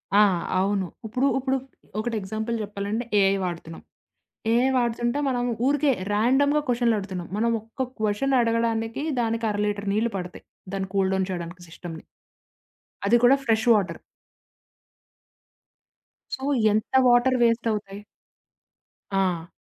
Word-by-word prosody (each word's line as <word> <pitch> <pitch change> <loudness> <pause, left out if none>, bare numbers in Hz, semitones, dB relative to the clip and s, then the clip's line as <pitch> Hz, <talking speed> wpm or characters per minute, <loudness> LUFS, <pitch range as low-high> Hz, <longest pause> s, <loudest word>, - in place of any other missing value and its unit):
ఆ! - - +7 0.4
అవును. 195 0 +1 0.2
ఇప్పుడు 250 +5 0
ఇప్పుడు 265 0 0 0.4
ఒకటి 230 +1 -2
ఎగ్జాంపుల్ 220 +4 -3
చెప్పాలంటే 205 +3 -3 0.2
ఏఐ 195 0 +4
వాడుతున్నాం. 165 -2 -6 0.7
ఏఐ 245 +3 +3
వాడుతుంటే, 240 +1 0
మనం 245 -2 0 0.2
ఊరికే 285 0 +3 0.2
రాండమ్‌గా 270 +8 +3
క్వొషన్లడుగుతున్నాం. 210 -7 0
మనం 230 +2 +1
ఒక్క 225 +4 -5
క్వొషన్ 215 +6 0
అడగడానికి 230 +1 0 0.2
దానికి 230 0 -1
అర 205 - -2
లీటర్ 205 -1 -2
నీళ్ళు 225 +2 0
పడతాయి. 180 -1 -7 0.3
దాన్ని 195 -1 -3
కూల్‌డౌన్ 190 -1 +1
చేయడానికి 175 0 -6
సిస్టమ్‌ని. 165 -1 -9 1.0
అది 240 +4 +5
కూడా 260 +3 +7
ఫ్రెష్ 225 +1 +1
వాటర్. 200 -4 0 2.4
సో, 265 - -11 0.3
ఎంత 215 +1 -1
వాటర్ 245 +1 +4
వేస్ట్ 230 0 +2
అవుతాయి? 205 -2 -4 1.1
ఆ! 185 -4 0
220 Hz, 115 wpm, -25 LUFS, 195-240 Hz, 2.4 s, ఆ